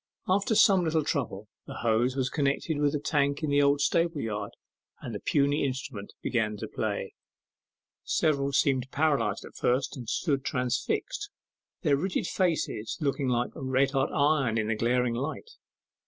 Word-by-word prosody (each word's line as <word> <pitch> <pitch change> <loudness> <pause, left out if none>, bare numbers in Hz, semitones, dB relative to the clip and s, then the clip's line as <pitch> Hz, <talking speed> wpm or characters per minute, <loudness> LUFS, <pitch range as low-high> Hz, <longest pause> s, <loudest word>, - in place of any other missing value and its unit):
After 200 +4 +2
some 195 -4 +6
little 160 -1 +1
trouble 110 -9 -2 0.2
the - - -7
hose 120 +3 +1
was 130 -2 -1
connected 145 +1 0
with 145 0 +2
a - - 0
tank 140 0 0
in 150 - 0
the 145 0 +4
old 140 0 +3
stable 165 +1 +1
yard, 105 -4 -3 0.5
and - - -7
the - - -4
puny 145 +1 +1
instrument 130 -6 -4
began 105 -3 0
to - - -5
play. - - -3 0.9
Several 140 -3 +1
seemed 135 -2 +2
paralyzed 140 -9 0
at - - -12
first, 125 +2 0
and 120 -4 -7
stood 140 -1 0
transfixed, 410 - -2 0.5
their 145 -4 +3
rigid 180 +5 -1
faces 160 - -1
looking 140 -2 0
like 120 -1 0
red 130 +1 +1
hot 135 0 +1
iron 140 -6 +2
in 110 -1 0
the 115 - +1
glaring 120 +2 +1
light. 150 - -4
140 Hz, 160 wpm, -28 LUFS, 125-155 Hz, 0.9 s, some